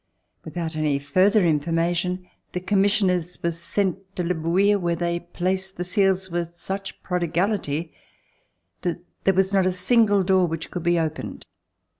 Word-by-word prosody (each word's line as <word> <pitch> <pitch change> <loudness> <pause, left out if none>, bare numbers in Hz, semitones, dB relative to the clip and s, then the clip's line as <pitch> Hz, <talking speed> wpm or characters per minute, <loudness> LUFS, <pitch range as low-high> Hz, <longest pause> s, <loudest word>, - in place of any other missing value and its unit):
Without 160 0 -4
any 150 -2 +1
further 185 +9 +3
informa 165 +2 +1
tion, 180 +1 -2 0.3
the 180 - -1
commissioners 190 -2 +1
were 170 - +2
sent 190 +3 -3
to 180 - -1
Le 175 +1 +1
Bouilh 185 +5 +2
where 170 -2 0
they 170 0 -1
placed 185 +2 -3
the 180 - -2
seals 190 -1 +1
with 170 0 -3
such 195 0 -6
prodigality 175 -2 -1 0.9
that 175 0 -2 0.2
there 195 - +4
was 190 +1 +2
not 190 -2 +4
a - - +2
single 205 +2 +3
door 185 -1 +3
which 165 -1 -5
could 180 - -3
be 175 +1 +2
opened. 160 -1 -3
180 Hz, 155 wpm, -24 LUFS, 170-190 Hz, 0.9 s, there